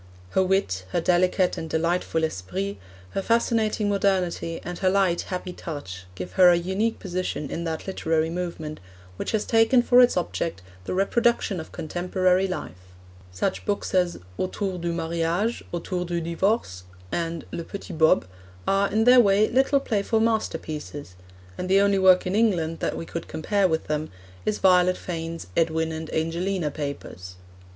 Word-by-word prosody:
Her -, -, +3 dB
wit, 185 Hz, -, 0 dB
her -, -, +2 dB
delicate 180 Hz, +2 st, +2 dB
and 160 Hz, -, -6 dB
delightful 165 Hz, 0 st, 0 dB
esprit, 100 Hz, -, -3 dB, 0.3 s
her 195 Hz, -, -2 dB
fascinating 225 Hz, -1 st, +1 dB
modernity, 185 Hz, -4 st, 0 dB
and 175 Hz, -1 st, -6 dB
her 190 Hz, -, +3 dB
light, 185 Hz, -3 st, +2 dB
happy 180 Hz, 0 st, -4 dB
touch, 95 Hz, -, -7 dB
give 90 Hz, 0 st, -6 dB
her 180 Hz, -1 st, +7 dB
a 175 Hz, -, +6 dB
unique 190 Hz, +6 st, -1 dB
position 180 Hz, -6 st, -4 dB
in 170 Hz, -, -3 dB
that 160 Hz, -1 st, -3 dB
literary 160 Hz, -4 st, 0 dB
movement 170 Hz, -3 st, -5 dB, 0.4 s
which -, -, -3 dB
has 215 Hz, -2 st, 0 dB
taken 225 Hz, +2 st, +4 dB
for 245 Hz, 0 st, +6 dB
its 245 Hz, -5 st, +4 dB
object 165 Hz, -, -2 dB, 0.2 s
the -, -, -3 dB
reproduction 205 Hz, 0 st, +1 dB
of 160 Hz, -, -8 dB
contemporary 180 Hz, +3 st, 0 dB
life. 90 Hz, -, -5 dB, 0.5 s
Such 90 Hz, -, -2 dB
books 205 Hz, -1 st, -2 dB
as 180 Hz, -2 st, +2 dB, 0.2 s
Autour 185 Hz, 0 st, -2 dB
du 170 Hz, 0 st, -2 dB
Mariage, 170 Hz, +6 st, -1 dB
Autour 180 Hz, +1 st, -3 dB
du 170 Hz, 0 st, -2 dB
Divorce, 170 Hz, -, -1 dB, 0.3 s
and 165 Hz, -1 st, -2 dB
Le 170 Hz, -, -4 dB
Petit 195 Hz, +2 st, -8 dB
Bob, 160 Hz, -, +4 dB, 0.4 s
are, 195 Hz, +1 st, +2 dB
in 220 Hz, +2 st, +2 dB
their 250 Hz, +2 st, +7 dB
way, 205 Hz, -1 st, +5 dB
little 270 Hz, +3 st, +3 dB
playful 220 Hz, -3 st, 0 dB
masterpieces, 160 Hz, -, -2 dB, 0.5 s
and 185 Hz, -, -3 dB
the 195 Hz, +1 st, +5 dB
only 200 Hz, -1 st, +3 dB
work 185 Hz, -1 st, +5 dB
in 185 Hz, -, -1 dB
England 180 Hz, -7 st, +1 dB
that -, -, -2 dB
we -, -, -5 dB
could 170 Hz, 0 st, -6 dB
compare 195 Hz, +5 st, +1 dB
with 160 Hz, -2 st, -1 dB
them 150 Hz, +1 st, -2 dB, 0.4 s
is 215 Hz, -, +1 dB
Violet 180 Hz, -1 st, +4 dB
Fane's 165 Hz, -1 st, -5 dB
Edwin 160 Hz, 0 st, +1 dB
and 160 Hz, 0 st, -6 dB
Angelina 165 Hz, +1 st, -1 dB
Papers. 140 Hz, -, -6 dB
180 Hz, 160 wpm, -25 LUFS, 160-195 Hz, 0.5 s, her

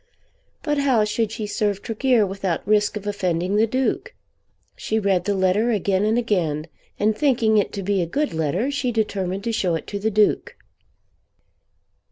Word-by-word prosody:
But 295 Hz, -2 st, 0 dB
how 260 Hz, -6 st, +3 dB
should 215 Hz, 0 st, -1 dB
she 225 Hz, -1 st, -4 dB
serve 205 Hz, -1 st, -1 dB
Tregear 235 Hz, -1 st, +2 dB
without 195 Hz, -2 st, -3 dB
risk 210 Hz, 0 st, +2 dB
of 205 Hz, -, -8 dB
offending 185 Hz, -2 st, -1 dB
the 220 Hz, +2 st, +3 dB
Duke? 265 Hz, -, -1 dB, 0.6 s
She 220 Hz, -, -2 dB
read 195 Hz, -4 st, +1 dB
the 205 Hz, -, 0 dB
letter 190 Hz, +5 st, +2 dB
again 200 Hz, -2 st, +1 dB
and 220 Hz, +2 st, +2 dB
again, 175 Hz, -10 st, 0 dB, 0.3 s
and 215 Hz, +1 st, +2 dB
thinking 230 Hz, -5 st, +3 dB
it 205 Hz, -, -1 dB
to 200 Hz, -, -4 dB
be 200 Hz, 0 st, +1 dB
a 170 Hz, -, -1 dB
good 290 Hz, -, -1 dB
letter 165 Hz, -, -1 dB
she 280 Hz, -3 st, -1 dB
determined 200 Hz, -4 st, -2 dB
to 235 Hz, -, -1 dB
show 185 Hz, -6 st, 0 dB
it 160 Hz, -, -5 dB
to 200 Hz, -, -5 dB
the 215 Hz, +2 st, 0 dB
Duke. 210 Hz, 0 st, +1 dB
210 Hz, 175 wpm, -22 LUFS, 190-230 Hz, 0.6 s, how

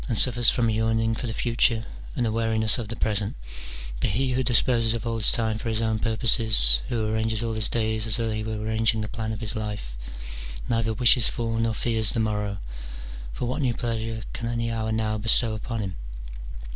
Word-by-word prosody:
299 115 Hz, -4 st, +8 dB
suffers 120 Hz, -1 st, +4 dB
from 120 Hz, -3 st, +1 dB
a -, -, +2 dB
yearning 115 Hz, +1 st, +1 dB
for 120 Hz, +2 st, -4 dB
the -, -, -3 dB
future, 115 Hz, 0 st, +1 dB, 0.3 s
and 120 Hz, -, 0 dB
a 110 Hz, -, 0 dB
weariness 110 Hz, 0 st, +1 dB
of 115 Hz, -, -4 dB
the 115 Hz, -, -5 dB
present: 105 Hz, -2 st, -1 dB, 0.6 s
but -, -, 0 dB
he 130 Hz, +6 st, 0 dB
who 130 Hz, +1 st, +1 dB
disposes 115 Hz, -2 st, +2 dB
of 115 Hz, -, -5 dB
all 115 Hz, -1 st, -1 dB
his 110 Hz, -, +2 dB
time 110 Hz, -2 st, 0 dB
for 115 Hz, -, -4 dB
his 110 Hz, -1 st, 0 dB
own 110 Hz, -1 st, 0 dB
purposes, 110 Hz, -, +4 dB
who 115 Hz, -2 st, -1 dB
arranges 110 Hz, +1 st, -1 dB
all 115 Hz, -1 st, -2 dB
his 110 Hz, -1 st, -2 dB
days 110 Hz, -1 st, -1 dB
as 110 Hz, -, -1 dB
though 115 Hz, -1 st, -1 dB
he 110 Hz, 0 st, -3 dB
were 110 Hz, 0 st, -3 dB
arranging 110 Hz, +1 st, 0 dB
the 105 Hz, -, -3 dB
plan 110 Hz, +1 st, -4 dB
of 110 Hz, +1 st, -5 dB
his 110 Hz, +1 st, -3 dB
life, 105 Hz, -, -5 dB, 0.7 s
neither 115 Hz, -1 st, 0 dB
wishes 115 Hz, +1 st, +4 dB
for 115 Hz, -1 st, -2 dB
nor 115 Hz, -1 st, 0 dB
fears 110 Hz, -2 st, 0 dB
the -, -, -1 dB
morrow: 105 Hz, -2 st, -1 dB, 0.7 s
for -, -, -4 dB
what 125 Hz, +5 st, -2 dB
new 125 Hz, -4 st, +1 dB
pleasure 115 Hz, -1 st, -3 dB
can 115 Hz, -, -4 dB
any 115 Hz, 0 st, -1 dB
hour 110 Hz, -1 st, -2 dB
now 110 Hz, -1 st, -1 dB
bestow 110 Hz, +1 st, +3 dB
upon 110 Hz, +1 st, -4 dB
him 95 Hz, -2 st, -4 dB
110 Hz, 210 wpm, -25 LUFS, 110-115 Hz, 0.7 s, 299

